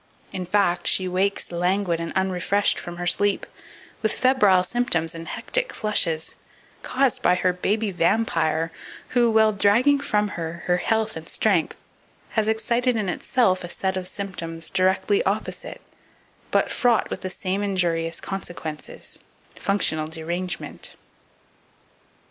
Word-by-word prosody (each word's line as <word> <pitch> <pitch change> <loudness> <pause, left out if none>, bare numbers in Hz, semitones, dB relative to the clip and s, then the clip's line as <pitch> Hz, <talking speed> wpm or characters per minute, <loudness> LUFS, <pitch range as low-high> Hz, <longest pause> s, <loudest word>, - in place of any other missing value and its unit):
In 185 -1 -4
fact, 185 -2 +2
she 185 - +3
wakes 190 +2 0
languid 180 0 +1
and 165 0 -4
unrefreshed 190 +1 +1
from 175 0 -7
her 175 - -4
sleep, 205 +3 +1 0.6
with 220 - +1
febrile 210 -8 +4
symptoms 180 -7 0
and 165 0 -8
hectic - - -1
flushes, 170 -7 0 0.5
caused 265 -2 +1
by 180 - +4
her 180 0 +1
baby 205 +4 0
vampire, 165 -4 +1 0.4
who, 240 -1 +3
while 220 -1 +5
dragging 235 +8 +4
from 210 -7 0
her 170 -2 -5
her 180 0 +3
health 220 +3 0
and 160 0 -8
strength, 190 -7 +1 0.5
has 220 -1 0
excited 235 +3 +1
in 210 -4 -1
itself 185 -1 +1
a 175 - -6
set 190 +1 -2
of 185 -1 -3
symptoms 165 -5 -5
directly 190 - +2
opposite, - - -3 0.7
but - - +2
fraught 240 -2 +2
with - - -4
the 185 - -3
same 190 +2 -2
injurious 170 -4 0
consequences 170 -5 -7 0.3
"functional 160 -6 0
derangement." 170 +3 -5
190 Hz, 130 wpm, -24 LUFS, 175-215 Hz, 0.7 s, while